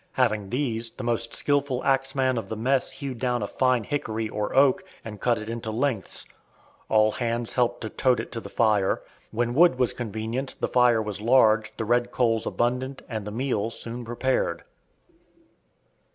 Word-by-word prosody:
Having 110 -6 +1
these, 120 -3 -2
the 130 - -9
most 115 -1 -1
skillful 140 -3 0
axeman 135 -1 +1
of 100 -4 -8
the 110 - -3
mess 130 +4 +1
hewed 135 -4 -6
down 125 -3 0
a - - -2
fine 130 -1 +1
hickory 110 -3 -2
or 105 -1 -3
oak, 140 +6 +4 0.2
and 105 -2 -8
cut 120 -2 +2
it 110 0 -6
into 115 -1 -4
"lengths." 115 -2 -2 0.6
All 110 0 +4
hands 115 0 -2
helped 125 -2 +1
to 110 - -4
"tote" 130 -2 +2
it - - -5
to 115 - -4
the - - -9
fire. 105 -4 +2 0.3
When 120 +2 -1
wood 165 -1 +5
was 125 -2 +1
convenient, 115 +3 -4
the - - 0
fire 120 -3 +4
was 105 -1 -5
large, 110 -2 +4
the 115 - -2
red 120 +2 +2
coals 115 -3 +1
abundant, 125 +3 -1
and 110 -4 -4
the - - -4
meal 115 -2 -1
soon 120 +1 -6
prepared. 120 +3 -1
120 Hz, 175 wpm, -26 LUFS, 110-130 Hz, 0.6 s, wood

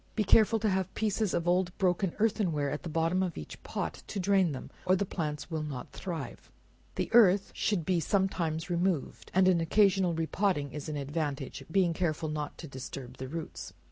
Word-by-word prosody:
Be 215 - +2
careful 220 +3 +5
to 220 0 +1
have 190 -2 0
pieces 215 -2 0
of 170 0 -1
old 180 0 +1
broken 185 -1 +1
earthen 210 -4 +2
ware 145 -2 -1
at 150 - -3
the 170 - -6
bottom 165 +3 +1
of 180 -3 -2
each 75 - -8
pot, - - -4
to 200 - -4
drain 190 -2 +3
them, 135 - -7
or 185 - +4
the 200 - 0
plants 155 -3 -4
will 160 -1 -1
not 140 -5 -6
thrive. 165 -9 -6 0.5
The - - -2
earth 200 -4 +6
should 190 -7 0
be 185 -2 +2
sometimes 170 -3 0
removed, 175 -4 -1
and 190 0 +5
an 180 -3 +4
occasional 190 0 +3
re 165 0 0
potting, 165 -6 0
is 150 +3 -6
an 150 - -3
advantage; 145 -1 -3
being 185 -3 +3
careful 160 -2 -1
not 150 -1 -4
to 165 - -8
disturb 130 -1 -8
the 130 - -5
roots. 160 +3 -6
175 Hz, 200 wpm, -30 LUFS, 150-190 Hz, 0.5 s, earth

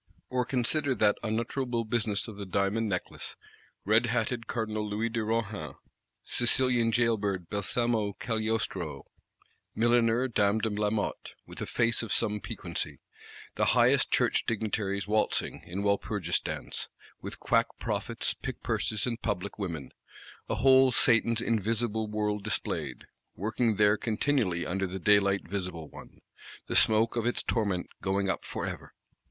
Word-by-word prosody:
Or 125 -1 +1
consider 135 +2 0
that 105 -1 +3
unutterable 115 +2 -1
business 110 -2 0
of 110 -3 -9
the 100 - -5
Diamond 100 +4 0
Necklace. 90 -3 -4 0.5
Red 110 +4 +4
hatted 120 0 -1
Cardinal 110 -2 -2
Louis 110 +3 -1
de 115 -1 -2
Rohan; 105 -10 -2 0.5
Sicilian 120 -1 +3
jail 115 -1 +3
bird 100 -4 -3
Balsamo 105 +1 0
Cagliostro; 110 - -2 0.7
milliner 120 +2 +3
Dame 105 -3 +2
de 110 0 -1
Lamotte, 105 0 -2
"with - - -10
a - - -3
face 115 -2 +2
of 115 -3 -5
some 105 0 +3
piquancy:" - - -5 0.6
the - - +1
highest - - +4
Church - - +2
Dignitaries 105 -3 -1
waltzing, 105 0 0
in 95 +3 -4
Walpurgis 100 -3 0
Dance, - - -5 0.3
with - - -6
quack - - +2
prophets, - - -2
pickpurses 110 -2 -2
and 120 -1 -3
public 100 -1 -3
women;—a 80 -9 -7
whole 130 +3 +6
Satan's 115 -1 +3
Invisible 110 0 0
World 105 -1 -1
displayed; 105 0 -3 0.3
working 110 +3 0
there 105 +1 +4
continually 110 -6 0
under 95 +1 -1
the 95 +1 -5
daylight 100 +1 +3
visible 90 -4 -4
one; - - -13 0.4
the - - -4
smoke 110 +2 +4
of 115 -1 0
its 120 - 0
torment 100 -6 0 0.2
going 95 0 0
up - - -1
for - - -4
ever! - - -7
110 Hz, 135 wpm, -29 LUFS, 100-115 Hz, 0.7 s, whole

